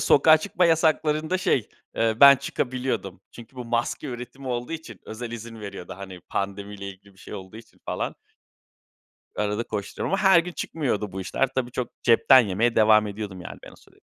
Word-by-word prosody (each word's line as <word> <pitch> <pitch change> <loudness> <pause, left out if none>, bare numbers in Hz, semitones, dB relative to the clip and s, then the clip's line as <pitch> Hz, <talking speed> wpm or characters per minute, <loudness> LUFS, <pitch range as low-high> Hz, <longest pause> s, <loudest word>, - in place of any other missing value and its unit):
sokağa 155 +3 +6
çıkma 175 +3 0
yasaklarında, 160 +1 +2
şey, 130 - +1 0.3
eee, 115 -1 +1
ben 140 0 +10
çıkabiliyordum. 125 -9 -3
Çünkü 120 +2 -14
bu 125 - -6
maske 120 +5 -2
üretimi 130 +2 -7
olduğu 120 +3 -3
için 140 - -8
özel 115 +2 -7
izin 115 -1 -8
veriyordu. 100 -3 -8
Hani, 95 -2 -9
pandemi 100 +1 -4
ile 100 -1 -7
ilgili 100 +1 -13
bir - - -24
şey - - -10
olduğu 95 +1 -9
için 115 - -15
falan. - - -3 1.2
Arada 105 +2 -1
koşturuyorum 100 - -4
ama 195 - -1
her 190 -3 +7
gün 175 +1 -7
çıkmıyordu 120 - -3
bu 95 - -5
işler. 115 +8 0
Tabii, 125 -2 -1
çok 125 -1 -3
cepten 125 +2 +6
yemeye 115 +2 0
devam 110 -1 +5
ediyordum 100 -2 -6
yani 90 - -9
ben - - -12
o - - -16
süre. - - -23
115 Hz, 180 wpm, -25 LUFS, 100-135 Hz, 1.2 s, ben